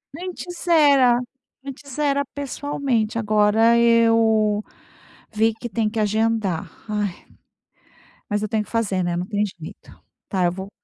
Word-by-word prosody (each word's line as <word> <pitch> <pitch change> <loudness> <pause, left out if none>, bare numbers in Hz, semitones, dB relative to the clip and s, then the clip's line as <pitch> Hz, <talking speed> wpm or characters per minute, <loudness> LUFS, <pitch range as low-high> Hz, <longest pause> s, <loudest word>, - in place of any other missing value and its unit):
Antes 355 0 -7
era 280 -7 +5 0.5
antes 275 0 -9
era 280 -1 +1
pessoalmente, 270 -5 -2
agora 215 +2 +3
eu 225 -2 +3 0.7
vi 220 +1 +2
que 240 +2 -8
tem 215 0 0
que 220 0 -4
agendar, 215 -4 0 0.2
ai! 210 -1 -1 1.2
Mas 205 0 -1
eu 215 - -2
tenho 220 -1 0
que - - -18
fazer, 200 -5 -1
né, 175 0 -1
não 180 - -2
tem 210 -1 0 0.2
jeito, 160 - -12 0.3
tá, 185 -2 0
eu 175 - +2
vou 190 +2 -7
225 Hz, 140 wpm, -22 LUFS, 210-250 Hz, 1.2 s, era